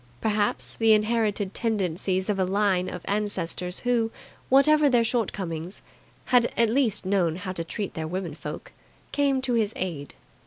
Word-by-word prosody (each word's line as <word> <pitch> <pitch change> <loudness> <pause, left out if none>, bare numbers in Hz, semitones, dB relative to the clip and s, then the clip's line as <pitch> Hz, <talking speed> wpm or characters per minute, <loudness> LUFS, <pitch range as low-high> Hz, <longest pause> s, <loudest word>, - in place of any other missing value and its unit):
Perhaps 210 -1 0
the 225 -1 +5
inherited 215 -2 +1
tendencies 190 -4 -1
of 205 -2 0
a - - +3
line 190 -1 +1
of 180 - -7
ancestors 185 -3 -2
who, 240 -2 +1 0.4
whatever 295 +2 +5
their 240 -3 +4
shortcomings, 190 -7 -3 0.4
had 245 -2 +3
at 230 -2 +3
least 230 -6 +1
known 185 -4 +1
how 185 +1 -5
to 170 -2 -4
treat 195 +4 -5
their 160 -1 -4
women 180 +1 -4
folk, - - -8 0.4
came 275 -2 +1
to 255 -2 0
his 225 -2 +1
aid. 165 -6 -5
205 Hz, 155 wpm, -26 LUFS, 185-230 Hz, 0.4 s, the